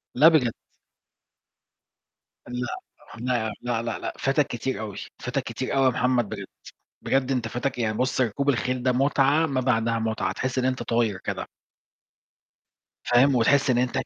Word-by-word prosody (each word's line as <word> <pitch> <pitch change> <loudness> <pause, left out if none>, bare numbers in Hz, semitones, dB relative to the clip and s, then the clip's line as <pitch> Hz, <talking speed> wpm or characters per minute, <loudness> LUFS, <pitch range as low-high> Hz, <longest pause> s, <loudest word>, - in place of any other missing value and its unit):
لا 145 +6 +7
بجد. 150 -8 +4 2.0
لأ، 125 0 -3 0.5
لأ، 120 -2 -1
لأ، 120 -2 -1
لأ، 115 -2 -4
لأ، - - -4
فاتك 135 +1 +2
كتير 130 +3 -3
أوي. 105 -3 -6 0.2
فاتك - - -2
كتير - - -4
أوي 135 -1 +3
يا - - +6
محمد 125 -3 +1
بجد، 100 -2 -5 0.6
بجد 135 0 +1
أنت 120 -4 -1
فاتك، 125 +3 -3
يعني 110 -2 0
بُصّ 130 +1 0
ركوب 130 +4 0
الخيل 125 -1 0
ده 130 - +2
متعة 140 +4 +3
ما 135 -4 -1
بعدها 115 -2 +1
متعة، 110 -4 -1
تحس 130 +4 -2
إن 130 - +1
أنت 130 -1 0
طاير 115 -4 0
كده. - - -4 1.6
فاهم؟ 130 +3 +4
وتحس 135 +4 +3
إن 125 - +3
أنت 125 0 +1
كده 130 - -1
125 Hz, 160 wpm, -25 LUFS, 115-135 Hz, 2.0 s, لا